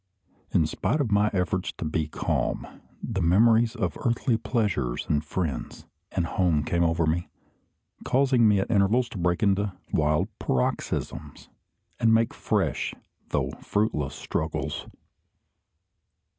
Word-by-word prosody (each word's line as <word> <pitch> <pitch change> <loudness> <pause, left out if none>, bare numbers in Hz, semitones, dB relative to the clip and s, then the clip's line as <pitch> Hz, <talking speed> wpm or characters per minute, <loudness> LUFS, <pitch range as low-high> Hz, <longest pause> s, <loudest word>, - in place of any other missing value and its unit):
In 80 - +3
spite 150 - -1
of 130 -7 0
my 105 +1 +4
efforts 95 -1 -1
to - - -6
be 80 0 -1
calm, - - -1 0.4
the 100 -5 -2
memories 110 +6 +4
of 90 -8 -2
earthly 120 +1 +1
pleasures, 105 - -1
and 75 0 +1
friends, 80 -2 -4 0.3
and 85 - 0
home 85 -3 +1
came 85 +2 +1
over 80 -1 +2
me, 85 +3 -1 0.7
causing 130 -3 +3
me 105 -1 +4
at 95 - -1
intervals 110 +4 +3
to 95 - -7
break 90 +2 +1
into 100 -1 +2 0.2
wild 75 +4 +2
paroxysms, 65 -1 -2 0.5
and 115 - +4
make 115 0 +2
fresh, - - -1 0.3
though - - 0
fruitless, 75 - -1
struggles. 80 0 -3
95 Hz, 130 wpm, -26 LUFS, 80-110 Hz, 0.7 s, my